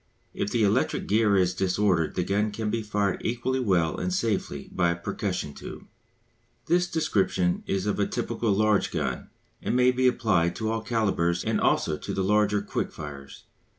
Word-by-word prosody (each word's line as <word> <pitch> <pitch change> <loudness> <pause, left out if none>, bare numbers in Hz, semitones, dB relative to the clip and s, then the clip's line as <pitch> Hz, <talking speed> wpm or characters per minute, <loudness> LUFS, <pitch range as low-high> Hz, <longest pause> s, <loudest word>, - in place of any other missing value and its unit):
If 100 - -2
the 115 0 +1
electric 105 +5 +1
gear 105 -1 +3
is 90 -1 +2
disordered 95 -3 +1
the 90 - +1
gun 100 +4 0
can 105 0 -3
be 115 - -1
fired 105 -2 -1
equally 120 +3 -1
well 90 -9 +1
and 185 - -2
safely 115 - -2
by 85 -1 +2
a 85 - 0
percussion 90 -3 -3
tube. - - -9 0.8
This 180 +1 +2
description 95 - 0
is 95 0 -1
of 105 - -1
a 100 - +2
typical 115 -1 -1
large 105 0 +2
gun, - - -3 0.3
and - - -1
may 125 0 +5
be 130 0 +2
applied 95 -9 +2
to 110 -1 -2
all 115 0 -1
calibres 100 -7 0
and - - 0
also 75 - +2
to - - -5
the 95 - 0
larger 105 +1 +2
quick - - -3
firers. 70 -2 -9
105 Hz, 180 wpm, -26 LUFS, 90-115 Hz, 0.8 s, may